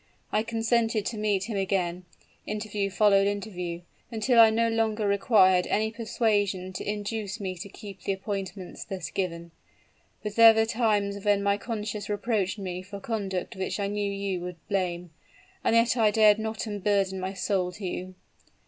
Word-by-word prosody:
I -, -, +2 dB
consented 225 Hz, -1 st, 0 dB
to 230 Hz, -, -3 dB
meet 205 Hz, -3 st, +1 dB
him 215 Hz, -1 st, -3 dB
again: 185 Hz, -2 st, -1 dB, 0.4 s
interview 210 Hz, -1 st, -2 dB
followed 200 Hz, 0 st, +4 dB
interview, 180 Hz, -4 st, -4 dB, 0.3 s
until 235 Hz, +1 st, +2 dB
I 225 Hz, -1 st, +9 dB
no 230 Hz, +1 st, +2 dB
longer 225 Hz, -2 st, 0 dB
required 195 Hz, -3 st, +4 dB
any 220 Hz, +1 st, +1 dB
persuasion 205 Hz, -5 st, 0 dB
to -, -, -5 dB
induce 210 Hz, 0 st, -3 dB
me 190 Hz, -2 st, -3 dB
to 200 Hz, +3 st, -7 dB
keep 200 Hz, 0 st, -10 dB
the -, -, -1 dB
appointments 195 Hz, -2 st, -5 dB
thus 185 Hz, -5 st, -6 dB
given. 170 Hz, -3 st, -3 dB, 0.7 s
But 210 Hz, 0 st, -5 dB
there 225 Hz, -1 st, +9 dB
were 220 Hz, 0 st, +3 dB
times 210 Hz, -3 st, 0 dB
when 205 Hz, -1 st, +2 dB
my 200 Hz, 0 st, +2 dB
conscience 210 Hz, -2 st, -4 dB
reproached 205 Hz, -1 st, -1 dB
me 185 Hz, -2 st, -4 dB
for 200 Hz, +2 st, -9 dB
conduct 200 Hz, -1 st, -3 dB
which 190 Hz, +2 st, -3 dB
I 200 Hz, -, 0 dB
knew 205 Hz, 0 st, -1 dB
you 195 Hz, -2 st, -2 dB
would 180 Hz, 0 st, -6 dB
blame; 180 Hz, -4 st, -2 dB, 0.5 s
and -, -, +2 dB
yet 230 Hz, +1 st, +4 dB
I 225 Hz, -3 st, +4 dB
dared 215 Hz, 0 st, +5 dB
not 220 Hz, +1 st, -3 dB
unburden 200 Hz, -2 st, 0 dB
my 185 Hz, +1 st, -3 dB
soul 185 Hz, -1 st, 0 dB
to 195 Hz, +2 st, -7 dB
you! 185 Hz, +1 st, -5 dB
205 Hz, 165 wpm, -27 LUFS, 190-220 Hz, 0.7 s, I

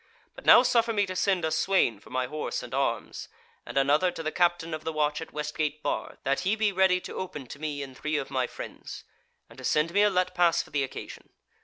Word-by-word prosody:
But -, -, -13 dB
now 245 Hz, -, +9 dB
suffer 235 Hz, -2 st, +2 dB
me 205 Hz, -2 st, +2 dB
to 185 Hz, -1 st, -6 dB
send 185 Hz, -3 st, +1 dB
a 160 Hz, -, -1 dB
swain 185 Hz, -, +2 dB
for -, -, -17 dB
my 130 Hz, 0 st, -1 dB
horse 150 Hz, +4 st, -4 dB
and 125 Hz, -, -9 dB
arms, 135 Hz, +1 st, -2 dB, 0.4 s
and -, -, -5 dB
another 145 Hz, +6 st, +4 dB
to 165 Hz, -2 st, -6 dB
the 155 Hz, -, -2 dB
captain 175 Hz, -2 st, +1 dB
of 155 Hz, 0 st, -5 dB
the 160 Hz, -, -2 dB
watch 150 Hz, -1 st, 0 dB
at 160 Hz, -, -8 dB
West 150 Hz, 0 st, -4 dB
gate 150 Hz, 0 st, -2 dB
Bar -, -, -3 dB
that 135 Hz, 0 st, +1 dB
he 190 Hz, +4 st, +1 dB
be 215 Hz, -2 st, +1 dB
ready 190 Hz, -1 st, +3 dB
to -, -, -8 dB
open 150 Hz, -7 st, -5 dB
to 140 Hz, -, -10 dB
me 150 Hz, -2 st, -3 dB
and 135 Hz, -1 st, -10 dB
three 155 Hz, +2 st, -2 dB
of 135 Hz, -, -4 dB
my 130 Hz, -2 st, 0 dB
friends, -, -, -9 dB, 0.4 s
and -, -, -15 dB
to -, -, -10 dB
send 155 Hz, +3 st, +1 dB
me 205 Hz, -, +4 dB
a 210 Hz, -, +5 dB
let 185 Hz, -2 st, 0 dB
pass 170 Hz, -1 st, +3 dB
for -, -, -18 dB
the 145 Hz, -2 st, +1 dB
occasion. 135 Hz, -, -8 dB
155 Hz, 250 wpm, -27 LUFS, 145-185 Hz, 0.4 s, now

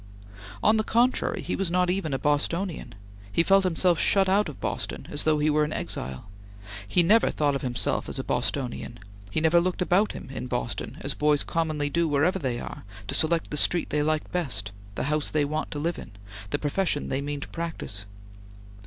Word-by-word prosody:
On 220 Hz, +1 st, +5 dB
the 215 Hz, -, +2 dB
contrary, 240 Hz, +4 st, +1 dB
he -, -, -2 dB
was 195 Hz, -3 st, 0 dB
not 180 Hz, 0 st, +2 dB
even 185 Hz, -5 st, -1 dB
a 135 Hz, -, 0 dB
Bostonian; 150 Hz, -, -1 dB, 0.4 s
he 170 Hz, -, +3 dB
felt 195 Hz, +2 st, +5 dB
himself 175 Hz, -1 st, +2 dB
shut 195 Hz, -1 st, +4 dB
out 195 Hz, -1 st, +3 dB
of 145 Hz, -, -10 dB
Boston -, -, -3 dB
as 145 Hz, -, -2 dB
though 155 Hz, -1 st, +4 dB
he 150 Hz, +1 st, +1 dB
were 150 Hz, 0 st, +3 dB
an 150 Hz, -, -2 dB
exile; 65 Hz, -, -4 dB, 0.6 s
he 175 Hz, -, +4 dB
never 215 Hz, +7 st, +5 dB
thought 145 Hz, -2 st, +1 dB
of 140 Hz, -, -2 dB
himself 125 Hz, -2 st, -1 dB
as -, -, -5 dB
a -, -, -2 dB
Bostonian; 125 Hz, -3 st, -2 dB, 0.3 s
he 100 Hz, -, 0 dB
never 160 Hz, +2 st, +4 dB
looked 180 Hz, +1 st, -1 dB
about 185 Hz, +3 st, +2 dB
him -, -, -9 dB
in 130 Hz, -, -5 dB
Boston, 120 Hz, -5 st, -3 dB
as 140 Hz, +1 st, -1 dB
boys 150 Hz, -1 st, +2 dB
commonly 155 Hz, -3 st, -1 dB
do 170 Hz, +1 st, +2 dB
wherever 160 Hz, +6 st, +2 dB
they 125 Hz, -6 st, -2 dB
are, -, -, -7 dB, 0.2 s
to -, -, -4 dB
select 165 Hz, +1 st, +3 dB
the 150 Hz, -, -2 dB
street 175 Hz, +3 st, +2 dB
they 150 Hz, -, +1 dB
like 155 Hz, +1 st, 0 dB
best, 110 Hz, -, -2 dB, 0.2 s
the -, -, -2 dB
house 150 Hz, +2 st, 0 dB
they 150 Hz, -2 st, +1 dB
want 155 Hz, +2 st, -2 dB
to -, -, -5 dB
live 165 Hz, +4 st, -2 dB
in, -, -, -9 dB, 0.4 s
the -, -, 0 dB
profession 150 Hz, 0 st, -1 dB
they 135 Hz, -, -1 dB
mean 145 Hz, 0 st, -3 dB
to -, -, -7 dB
practise. 160 Hz, -12 st, -5 dB
155 Hz, 205 wpm, -26 LUFS, 140-180 Hz, 0.6 s, On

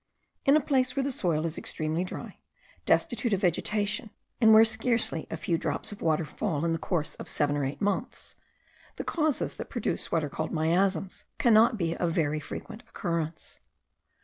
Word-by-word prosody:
In 280 Hz, +2 st, +6 dB
a -, -, +2 dB
place 255 Hz, -2 st, +1 dB
where 275 Hz, -, +1 dB
the 275 Hz, -, -1 dB
soil 165 Hz, -9 st, 0 dB
is 165 Hz, -1 st, -3 dB
extremely 155 Hz, +2 st, -2 dB
dry, 185 Hz, -, -7 dB, 0.5 s
destitute 240 Hz, -2 st, +2 dB
of 195 Hz, -, 0 dB
vegetation, 210 Hz, +4 st, +1 dB, 0.3 s
and 220 Hz, -1 st, +7 dB
where 220 Hz, +1 st, +9 dB
scarcely 225 Hz, -7 st, +1 dB
a 165 Hz, -, -4 dB
few 165 Hz, +1 st, -1 dB
drops -, -, -2 dB
of 205 Hz, -, -10 dB
water 160 Hz, 0 st, +1 dB
fall 160 Hz, 0 st, -2 dB
in 165 Hz, -, +1 dB
the 165 Hz, -, -1 dB
course 160 Hz, -3 st, -1 dB
of -, -, -8 dB
seven 145 Hz, -1 st, +1 dB
or 145 Hz, -, -1 dB
eight 135 Hz, +7 st, -5 dB
months, 200 Hz, -1 st, -2 dB, 0.6 s
the -, -, -4 dB
causes 310 Hz, -4 st, 0 dB
that -, -, -6 dB
produce -, -, -3 dB
what 165 Hz, -, +1 dB
are 145 Hz, -, -3 dB
called 155 Hz, +3 st, -4 dB
miasms, 175 Hz, +3 st, 0 dB
cannot 225 Hz, 0 st, +5 dB
be 170 Hz, -3 st, -1 dB
of 170 Hz, -2 st, -1 dB
very 155 Hz, -3 st, +1 dB
frequent 215 Hz, +8 st, -8 dB
occurrence. 165 Hz, -3 st, -4 dB
180 Hz, 180 wpm, -28 LUFS, 160-220 Hz, 0.6 s, where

